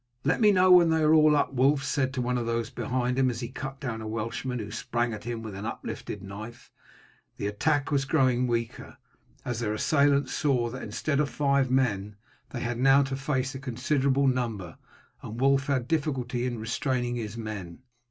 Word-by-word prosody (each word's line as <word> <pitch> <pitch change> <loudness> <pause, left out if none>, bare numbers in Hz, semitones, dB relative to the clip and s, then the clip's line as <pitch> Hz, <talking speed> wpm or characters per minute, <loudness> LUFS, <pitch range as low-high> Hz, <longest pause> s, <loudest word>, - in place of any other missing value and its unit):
"Let - - +1
me 210 -1 +6
know 185 -1 +5
when 175 -2 +7
they 160 -1 +2
are 155 +1 +5
all 155 -1 +6
up," 140 -1 +1
Wulf 135 +2 +3
said 130 -2 0
to 125 - -1
one 125 +1 -1
of 115 - -3
those 115 +1 -1
behind 125 0 -1
him, 130 -1 +3
as 120 0 -4
he 120 - -4
cut 135 +1 -7
down 115 -5 -4
a 110 - -6
Welshman 115 +3 -3
who 110 -2 -6
sprang 120 +1 -2
at 105 - -8
him 120 -1 -4
with 110 -2 -6
uplifted 100 -1 -6
knife. 110 +4 -9 0.7
The - - -4
attack 145 +8 0
was 140 -2 +2
growing 130 -4 +2
weaker, 115 -1 -3 0.5
as 120 -2 -2
their 105 -3 -1
assailants 140 +1 +2
saw 125 -5 +1
that 130 +2 -7
instead 145 -2 -2
of 150 -2 +1
five 140 -2 +1
men 105 -6 0 0.3
they 120 - -5
had 120 0 -3
now 135 +2 +5
to 135 0 -3
face 135 -1 -2
a 135 - -6
considerable 135 +2 0
number, 115 - -1 0.4
and 115 +2 -7
Wulf 135 0 +3
had 130 -4 0
difficulty 130 -6 -1
in 120 -2 -3
restraining 120 +2 -2
his 110 -1 -5
men. 105 -2 -7
125 Hz, 195 wpm, -27 LUFS, 115-140 Hz, 0.7 s, when